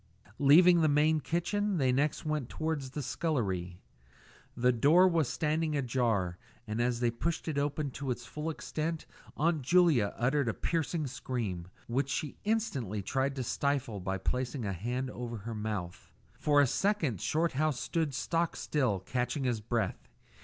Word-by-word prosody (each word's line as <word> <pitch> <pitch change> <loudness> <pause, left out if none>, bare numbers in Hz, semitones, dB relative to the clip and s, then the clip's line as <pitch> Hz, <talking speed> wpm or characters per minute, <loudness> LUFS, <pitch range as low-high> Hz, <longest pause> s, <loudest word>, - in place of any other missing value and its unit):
Leaving 170 +5 +7
the 155 - +4
main 155 +2 +3
kitchen, 190 +6 -1
they 130 -4 +3
next 140 +5 0
went 150 -5 -1
towards 155 -4 -2
the 145 +2 -5
scullery. 100 - -2 0.8
The 125 +1 +4
door 150 +10 +5
was 165 -7 +2
standing 155 0 0
ajar, 115 -9 0 0.3
and 110 +2 -2
as 120 0 0
they 120 -1 +2
pushed 165 +10 -2
it 150 -3 0
open 145 0 -1
to 140 +1 -5
its 120 -1 -3
full 150 +5 -4
extent 160 0 -3 0.3
Aunt 160 0 +2
Julia 150 - +3
uttered 135 +2 +1
a - - -2
piercing 165 -1 -1
scream, 120 -9 -4 0.2
which 130 +4 -1
she 145 0 -2
instantly 135 - -1
tried 135 +6 0
to 130 - -2
stifle 130 -4 -1
by 95 +1 -2
placing 125 +5 -2
her 100 -2 -2
hand 125 +8 -3
over 120 -2 -5
her 115 +3 -6
mouth. 105 -5 -5 0.2
For 145 +4 +2
a - - +5
second 160 - 0
Shorthouse 155 -3 +1
stood 150 +2 -1
stock 165 +5 0
still, 125 -11 0
catching 125 +6 -2
his 120 -4 0
breath. 110 -3 -2
135 Hz, 160 wpm, -31 LUFS, 120-155 Hz, 0.8 s, Leaving